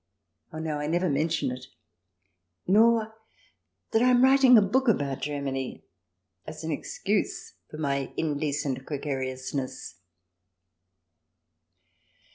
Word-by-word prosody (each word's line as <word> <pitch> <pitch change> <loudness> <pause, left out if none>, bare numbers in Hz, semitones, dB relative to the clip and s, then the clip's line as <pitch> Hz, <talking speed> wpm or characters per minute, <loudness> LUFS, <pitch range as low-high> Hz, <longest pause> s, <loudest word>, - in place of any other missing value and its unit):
Oh 155 - -8
no, 155 -2 -3
I 150 - -3
never 175 +1 +1
mention 150 -1 0
it, 125 +1 -8 1.0
nor 220 +2 +4 0.8
that 225 - +3
I 250 - +4
am 250 0 +5
writing 265 -2 +7
a - - +7
book 260 +7 +1
about 145 - +1
Germany 135 -2 -4 0.6
as 155 +1 -8
an 160 - -3
excuse 200 +7 -2 0.2
for 155 - -9
my 140 -3 -2
indecent 145 -3 -2
gregariousness. 130 - -4
150 Hz, 105 wpm, -27 LUFS, 140-205 Hz, 1.0 s, writing